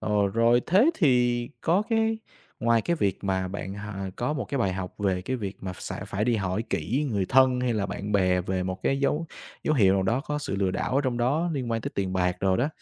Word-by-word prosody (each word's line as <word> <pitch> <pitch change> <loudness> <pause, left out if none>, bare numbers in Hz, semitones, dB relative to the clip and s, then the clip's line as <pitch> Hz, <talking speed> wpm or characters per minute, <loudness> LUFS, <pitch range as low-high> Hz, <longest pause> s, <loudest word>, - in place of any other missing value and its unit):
Ờ, 105 -1 +1
rồi 115 +2 +4
thế 210 - +5
thì 120 - +2
có 175 +5 +2
cái 225 0 +2 0.4
ngoài 115 -1 +3
cái 170 - 0
việc 100 - -1
mà 95 -1 0
bạn, 95 0 -5
à, 100 -2 -5
có 125 +5 -1
một 140 -6 -3
cái 140 +6 -3
bài 100 -6 +1
học 95 -1 -5
về 95 -3 0
cái 130 +7 -2
việc 100 -4 -5
mà 95 -1 -5
sẽ - - -6
phải 105 +2 -1
đi 120 -2 +2
hỏi 95 +2 -1
kỹ 120 - 0
người 100 -4 0
thân 130 -1 +4
hay 125 -2 0
là 100 -2 0
bạn 105 +1 -5
bè 90 -2 +3
về 95 0 -2
một 95 0 -4
cái 135 0 +1
dấu 150 +4 0 0.4
dấu 155 - +2
hiệu 95 -7 +5
nào 95 - +2
đó 115 +7 +1
có 150 +1 -3
sự 120 -9 -3
lừa 95 -1 +1
đảo 100 +6 -2
ở 135 - +4
trong 125 -2 0
đó, 150 +8 +1
liên 130 -5 -3
quan 115 -1 0
tới - - -4
tiền 95 -2 -1
bạc 90 -1 +1
rồi 95 -1 +2
đó, 135 +5 +1
110 Hz, 255 wpm, -26 LUFS, 95-130 Hz, 0.4 s, thế